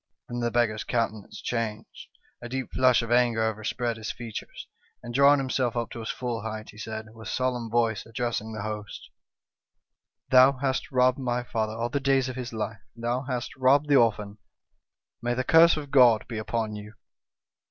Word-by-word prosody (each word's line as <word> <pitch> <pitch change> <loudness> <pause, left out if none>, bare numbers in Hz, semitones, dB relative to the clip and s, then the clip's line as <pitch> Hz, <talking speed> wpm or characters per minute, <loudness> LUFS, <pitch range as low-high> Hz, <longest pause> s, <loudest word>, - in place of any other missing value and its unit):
"Then 120 - -4
the 120 0 0
beggar's 115 -3 +1
countenance 110 -4 -3
changed, 115 -2 -4 0.3
a 120 - -7
deep 130 +1 -4
flush 130 -2 +4
of 115 - -5
anger 120 -2 +3
overspread 110 +2 -2
his 110 +1 -4
features, 115 -3 -8 0.4
and 120 -1 -7
drawing 140 +2 +6
himself 130 -3 -1
up 115 -1 -2
to - - -7
his 110 - -6
full 120 -3 -3
height, 110 0 -6
he 105 - -15
said, 110 0 -6
with 110 -1 -11
solemn 125 -3 -1
voice, 115 -2 +1
addressing 115 -1 -3
the 110 -2 -5
host: 105 -1 -7 1.2
"'Thou 130 +1 +7
hast 135 0 -2
robbed 125 0 +3
my 125 -1 -1
father 110 -2 -2
all 115 +1 -2
the 140 - -1
days 135 -1 +2
of 130 - -6
his 125 -1 -5
life, 110 -1 -4
and 115 - -12
thou 120 +2 0
hast 125 -2 -4
robbed 135 +3 +3
the 145 - +5
orphan. 105 -4 +2 0.8
May 120 0 -1
the 130 - -1
curse 165 +4 +6
of 145 -2 -7
God 120 -6 +5
be 115 -3 -4
upon 110 -1 -2
you 105 +1 -10
120 Hz, 185 wpm, -26 LUFS, 110-130 Hz, 1.2 s, Thou